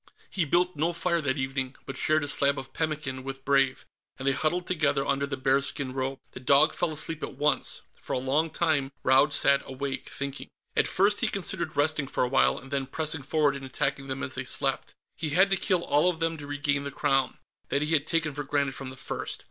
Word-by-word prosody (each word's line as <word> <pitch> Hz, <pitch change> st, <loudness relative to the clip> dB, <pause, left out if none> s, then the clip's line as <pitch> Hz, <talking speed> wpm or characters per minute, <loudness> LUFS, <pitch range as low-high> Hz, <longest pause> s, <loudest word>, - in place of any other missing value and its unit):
He 180 Hz, -5 st, 0 dB
built 175 Hz, +4 st, +1 dB
no 165 Hz, +4 st, 0 dB
fire 170 Hz, 0 st, 0 dB
that 135 Hz, -1 st, -1 dB
evening, 130 Hz, -1 st, -2 dB
but 135 Hz, -, -6 dB
shared 155 Hz, +3 st, +2 dB
a -, -, -3 dB
slab 140 Hz, 0 st, +3 dB
of 135 Hz, -, -7 dB
pemmican 150 Hz, -5 st, -3 dB
with 135 Hz, 0 st, -7 dB
Brave, 135 Hz, -1 st, +2 dB, 0.3 s
and 135 Hz, -, -4 dB
they -, -, +5 dB
huddled 155 Hz, +6 st, 0 dB
together 150 Hz, -5 st, +1 dB
under 140 Hz, 0 st, 0 dB
the 135 Hz, -1 st, -4 dB
bearskin 135 Hz, 0 st, +1 dB
robe. 135 Hz, 0 st, -2 dB
The -, -, -9 dB
dog 140 Hz, +4 st, +5 dB
fell 175 Hz, -, -1 dB
asleep 155 Hz, +1 st, -2 dB
at -, -, -5 dB
once. 150 Hz, +1 st, +2 dB, 0.2 s
For -, -, -5 dB
a -, -, +1 dB
long 140 Hz, +6 st, +1 dB
time, 155 Hz, -4 st, 0 dB
Raud 135 Hz, +3 st, +5 dB
sat 140 Hz, -1 st, +4 dB
awake, 135 Hz, 0 st, -5 dB
thinking. 140 Hz, 0 st, -5 dB, 0.3 s
At -, -, +3 dB
first, 205 Hz, +2 st, +2 dB
he -, -, +1 dB
considered 175 Hz, -5 st, 0 dB
resting 145 Hz, -1 st, +2 dB
for 135 Hz, -, -1 dB
a -, -, +1 dB
while, 135 Hz, -, +3 dB
and 135 Hz, -, -11 dB
then 135 Hz, -1 st, -1 dB
pressing 155 Hz, +2 st, +1 dB
forward 145 Hz, +1 st, +1 dB
and 135 Hz, -, -7 dB
attacking 135 Hz, +1 st, -2 dB
them 135 Hz, 0 st, -4 dB
as -, -, -4 dB
they -, -, -4 dB
slept. -, -, -2 dB, 0.2 s
He 155 Hz, -, -2 dB
had 195 Hz, +1 st, +5 dB
to -, -, +5 dB
kill 185 Hz, -3 st, 0 dB
all 150 Hz, +5 st, +3 dB
of 175 Hz, -, -2 dB
them 165 Hz, 0 st, 0 dB
to 145 Hz, -, -8 dB
regain 145 Hz, 0 st, -1 dB
the 140 Hz, -, -3 dB
Crown; 135 Hz, -2 st, 0 dB, 0.3 s
that 140 Hz, -, +1 dB
he 155 Hz, +2 st, -1 dB
had 150 Hz, -1 st, +2 dB
taken 160 Hz, -3 st, 0 dB
for 145 Hz, +1 st, -4 dB
granted 140 Hz, -1 st, 0 dB
from 135 Hz, -1 st, -6 dB
the 130 Hz, -, -10 dB
first. -, -, -5 dB
145 Hz, 230 wpm, -27 LUFS, 135-155 Hz, 0.3 s, they